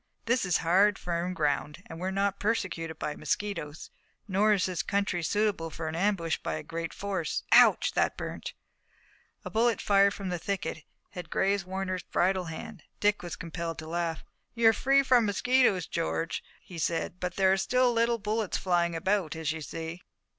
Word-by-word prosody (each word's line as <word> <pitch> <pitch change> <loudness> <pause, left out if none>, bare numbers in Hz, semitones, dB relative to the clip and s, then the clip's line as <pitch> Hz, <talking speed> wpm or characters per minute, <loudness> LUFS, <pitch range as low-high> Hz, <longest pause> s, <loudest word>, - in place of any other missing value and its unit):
This 235 -2 +2
is 180 -2 +2
hard, 195 +4 +4
firm 175 +1 -2
ground, 150 +2 -1
and 160 - -9
we're 185 +2 -2
not 200 +1 0
persecuted 185 -7 -2
by 150 - -3
mosquitoes. 155 -1 -3 0.4
Nor 205 +2 +3
is 195 - +1
the 185 -1 -2
country 200 -3 0
suitable 200 -2 0
for 160 0 -5
an 155 - -3
ambush 170 -3 +1
by 80 - -3
a 80 - -5
great 165 0 -5
force. 195 -5 -3
Ouch, - - +6
that - - +1
burnt!" - - -6 0.9
A - - -5
bullet 230 0 +2
fired 200 0 +4
from 195 -2 -4
a 175 - -2
thicket 175 -4 -3 0.3
had 175 -2 -8
grazed 195 0 +1
Warner's 185 -1 -3
bridle 185 0 0
hand. 165 +3 -8 0.2
Dick 205 0 +2
was 175 -1 -5
compelled 165 0 -5
to 160 - -7
laugh. 165 -1 -2 0.3
"You're 225 -1 +5
free 275 +5 +3
from 245 -4 +4
mosquitoes, 205 -4 +3
George," 80 +1 -2 0.2
he 175 -2 -9
said, 170 +2 -1
"but 180 -1 -3
there 190 -1 +4
are - - +2
still 250 +5 +2
little 235 0 +2
bullets 215 -1 -1
flying 175 -2 +1
about, 185 -1 0
as 160 -1 -1
you 160 0 -5
see." 165 +3 -6
185 Hz, 175 wpm, -29 LUFS, 165-205 Hz, 0.9 s, Ouch